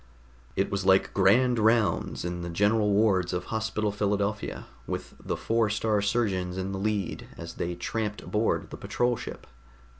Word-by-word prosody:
It 95 - 0
was 100 0 -1
like 95 0 +4
Grand 120 +6 +4
Rounds 110 -6 +2
in 90 0 -3
the 85 - -4
general 105 +4 +2
wards 100 -4 +3
of 90 0 -1
Hospital 110 -1 -1
Philadelphia, 100 0 -1 0.2
with - - -4
the - - -2
Four 115 -1 +1
star 105 0 +1
Surgeons 100 -4 0
in 95 +1 -2
the 95 - -3
lead 105 -1 -2
as 85 0 -7
they 85 +1 -3
tramped 105 +3 -3
aboard 110 +2 0
the - - -6
patrol 120 0 0
ship. - - -8
105 Hz, 160 wpm, -28 LUFS, 95-110 Hz, 0.2 s, like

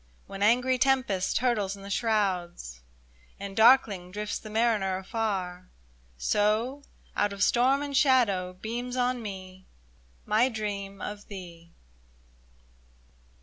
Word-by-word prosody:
When 195 0 -9
angry 250 +4 +3
tempest 255 -8 +1
hurtles 215 -6 0
in 195 - -13
the 200 - -8
shrouds, 185 - -1 0.6
And 200 -1 -7
darkling 220 -6 +5
drifts 210 +2 -4
the 215 - -10
mariner 215 -4 +1
afar. 190 -3 -3 0.5
So, 215 - +1 0.3
out 205 - +1
of 195 -1 -1
storm 265 +4 +3
and 285 -1 -4
shadow, 230 -10 +3
beams 240 +6 -5
on 250 -1 0
me 190 -3 -8 0.6
My 230 +5 +3
dream 200 -3 -5
of 205 0 -7
thee 170 -4 -11
210 Hz, 115 wpm, -28 LUFS, 190-240 Hz, 0.6 s, darkling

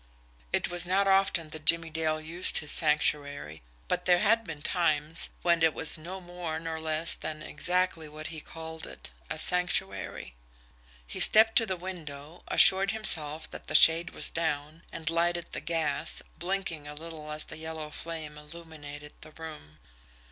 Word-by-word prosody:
It - - +1
was 175 0 0
not 195 +2 +2
often 190 -5 +2
that 155 0 -7
Jimmie 165 0 +4
Dale 155 0 0
used 165 +3 +2
his 150 - +2
Sanctuary, 145 - 0 0.3
but - - -1
there 180 -1 +5
had 225 +4 +3
been 155 -5 -8
times 155 -3 +1
when 170 -1 +3
it 160 -1 +3
was 160 - +4
no 175 +4 -7
more 175 -3 -5
nor 160 -1 -5
less 160 +1 +1
than 155 -1 -5
exactly 180 -3 0
what 155 +1 -10
he 155 - -7
called 160 0 -8
it - - -8 0.2
a - - -4
sanctuary! 100 - -1 0.7
He - - -6
stepped 225 +1 +6
to 225 - +4
the 190 -2 -2
window, 165 -3 -8
assured 195 +1 +6
himself 160 -8 +2
that - - -10
the - - -3
shade 165 +2 +7
was - - +2
down 155 -1 -3
and 160 - -9
lighted 170 +1 0
the - - -5
gas, 160 -1 -2 0.2
blinking 175 -4 -3
a 150 - -8
little 155 -1 -8
as 155 0 -2
the - - -9
yellow 160 -1 -6
flame 155 -2 -6
illuminated 150 -2 -10
the - - -11
room. 155 - -11
160 Hz, 165 wpm, -29 LUFS, 150-175 Hz, 0.7 s, shade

